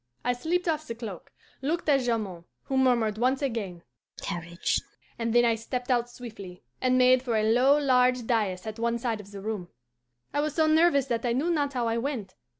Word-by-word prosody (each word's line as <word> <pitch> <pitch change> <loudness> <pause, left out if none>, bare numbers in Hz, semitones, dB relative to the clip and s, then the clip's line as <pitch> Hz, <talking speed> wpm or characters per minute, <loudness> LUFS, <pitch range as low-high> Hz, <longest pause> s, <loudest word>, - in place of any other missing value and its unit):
I 245 - +1
slipped 340 +9 -1
off 310 -1 -1
the 230 - -4
cloak, 220 -6 -8 0.3
looked 315 +6 -2
at 280 -2 +5
Jamond, 215 -9 -2 0.2
who 270 - -3
murmured 235 -5 +2
once 260 +3 +1
again, 205 -10 -3 0.4
'Courage,' 170 0 -2 0.4
and 230 0 -1
then 240 +1 +5
I 230 - +4
stepped 245 +3 -4
out 240 -1 +1
swiftly, 210 -7 -10 0.2
and 255 0 +3
made 255 0 +5
for 245 -3 -1
a 215 - +1
low, 250 +6 +4
large 250 -3 +3
dais 205 -6 0
at 220 +1 -6
one 235 0 0
side 230 -2 -2
of 200 - -15
the 200 -1 -9
room. 205 -4 -4 0.7
I 290 - +1
was 305 -1 -2
so 315 - +3
nervous 310 -3 +4
that 235 -3 -2
I 240 -2 +1
knew 295 +8 +1
not 290 -4 0
how 245 -2 0
I 230 +1 0
went. 230 -8 -4
240 Hz, 205 wpm, -27 LUFS, 220-270 Hz, 0.7 s, at